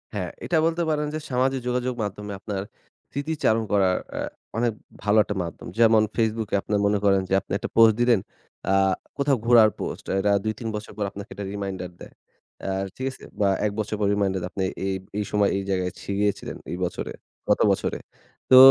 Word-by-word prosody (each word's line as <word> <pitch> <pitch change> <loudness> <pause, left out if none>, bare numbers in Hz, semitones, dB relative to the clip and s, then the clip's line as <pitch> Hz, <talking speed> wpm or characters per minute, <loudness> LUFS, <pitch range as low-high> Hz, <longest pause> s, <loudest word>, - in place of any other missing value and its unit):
হ্যাঁ, 90 -3 -2 0.2
এটা 170 - +2
বলতে 165 +1 +1
পারেন 150 -1 +1
যে, 155 - -2
সামাজিক 130 +1 +2
যোগাযোগ 125 0 0
মাধ্যমে 105 0 -5
আপনার 100 -1 -3 0.5
স্মৃতি 145 +4 -2
চারণ 110 0 +3
করার 95 -2 +3
অ্যা - - -3 0.4
অনেক 120 0 +2 0.3
ভালো 105 +1 +3
একটা 105 - -4
মাধ্যম। 85 - -7
যেমন 115 -1 +6
ফেসবুকে 110 -2 0
আপনার 105 -1 0
মনে 100 0 +3
করেন 95 -1 +5
যে - - 0
আপনি - - -16
একটা 120 +2 -5
পোস্ট 115 -1 +8
দিলেন, 120 -3 +5 0.5
আ - - +4 0.4
কোথাও 140 -2 +2
ঘোরার 115 -2 +7
পোস্ট। - - -5
এরা 100 +1 +2
২-৩ 110 +1 -3
বছর 105 0 -6
পর 105 - -1
আপনাকে 100 +1 -8
একটা 100 - -5
রিমাইন্ডার 95 -3 -4
দেয়। - - -11 0.5
অ্যা 95 - -2 0.2
ঠিক 130 - -4
আছে? - - -14 0.2
বা, 100 -2 +4 0.2
১ 105 - +1
বছর 105 0 -1
পর 100 - +2
রিমাইন্ডার 100 -2 +1
দেয়। 90 - -3
আপনি 95 - -2 0.2
এই 95 - 0 0.2
এই 105 - 0
সময় 105 -1 +3
এই 100 - -2
জায়গায় 90 -1 0
ছি - - -11
গিয়েছিলেন 105 -1 -1
এই 90 - -3
বছরে 90 - -4 0.4
গত - - +4
বছরে। - - -1 0.5
তো 130 - +10
105 Hz, 195 wpm, -25 LUFS, 100-120 Hz, 0.5 s, তো